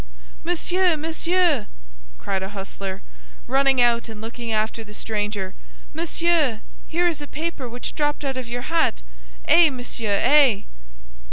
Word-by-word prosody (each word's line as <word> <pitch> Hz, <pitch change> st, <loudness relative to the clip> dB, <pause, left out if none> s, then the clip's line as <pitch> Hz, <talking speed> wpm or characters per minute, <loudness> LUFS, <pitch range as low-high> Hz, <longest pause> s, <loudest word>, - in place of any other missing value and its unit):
"Monsieur, 350 Hz, 0 st, +2 dB
monsieur!" 325 Hz, -, +1 dB, 0.5 s
cried 195 Hz, -1 st, -2 dB
a 190 Hz, -, -4 dB
hostler, 195 Hz, -1 st, -6 dB, 0.4 s
running 270 Hz, 0 st, +3 dB
out 235 Hz, -1 st, +3 dB
and 220 Hz, -1 st, -8 dB
looking 230 Hz, +1 st, -6 dB
after 220 Hz, +1 st, -1 dB
the 210 Hz, -1 st, -12 dB
stranger, 210 Hz, -3 st, -3 dB, 0.4 s
"monsieur, 325 Hz, -7 st, +1 dB, 0.3 s
here 345 Hz, +2 st, +1 dB
is 320 Hz, -4 st, -2 dB
a 290 Hz, -, -6 dB
paper 300 Hz, -5 st, -4 dB
which 245 Hz, +1 st, -5 dB
dropped 295 Hz, -1 st, -1 dB
out 270 Hz, -1 st, -1 dB
of 255 Hz, -2 st, -5 dB
your 245 Hz, +1 st, -4 dB
hat! 305 Hz, -, +1 dB, 0.4 s
Eh, 340 Hz, -2 st, +7 dB
monsieur, 235 Hz, -6 st, -2 dB
eh!" 275 Hz, -8 st, +5 dB
255 Hz, 140 wpm, -23 LUFS, 215-320 Hz, 0.5 s, Eh